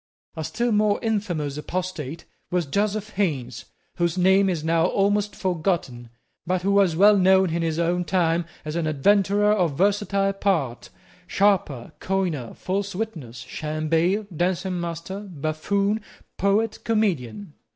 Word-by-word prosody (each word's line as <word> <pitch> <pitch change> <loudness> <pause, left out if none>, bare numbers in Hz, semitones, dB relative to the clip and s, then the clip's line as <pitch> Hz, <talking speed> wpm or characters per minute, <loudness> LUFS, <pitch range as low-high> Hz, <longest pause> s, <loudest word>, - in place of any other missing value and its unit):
A 160 - -4
still 240 +9 -1
more 210 -1 +3
infamous 175 -10 -1
apostate 165 -2 -4 0.2
was 175 -2 0
Joseph 205 +7 -1
Haines, 145 - -2 0.3
whose 170 -1 0
name 190 +2 +4
is 165 -4 -2
now 165 +1 +2
almost 205 +1 +1
forgotten, 160 - -2 0.4
but 180 0 0
who 200 - +1
was 195 -4 +3
well 205 +4 +6
known 190 -2 +4
in 170 +1 -1
his 160 -1 -1
own 175 +1 +1
time 170 -2 +1 0.2
as 155 +1 -4
an 170 -2 -1
adventurer 200 +7 +3
of 175 -9 0
versatile 200 0 +1
parts, 165 -12 -1 0.4
sharper, 185 -12 +1
coiner, 180 -11 -2
false 195 +1 -3
witness, 165 - -5
sham 155 0 -4
bail, 180 +6 +2
dancing 180 +1 -1
master, 170 +3 -5
buffoon, 195 +4 -1 0.3
poet, 210 +3 +1
comedian. 200 - -1
185 Hz, 135 wpm, -24 LUFS, 160-200 Hz, 0.4 s, well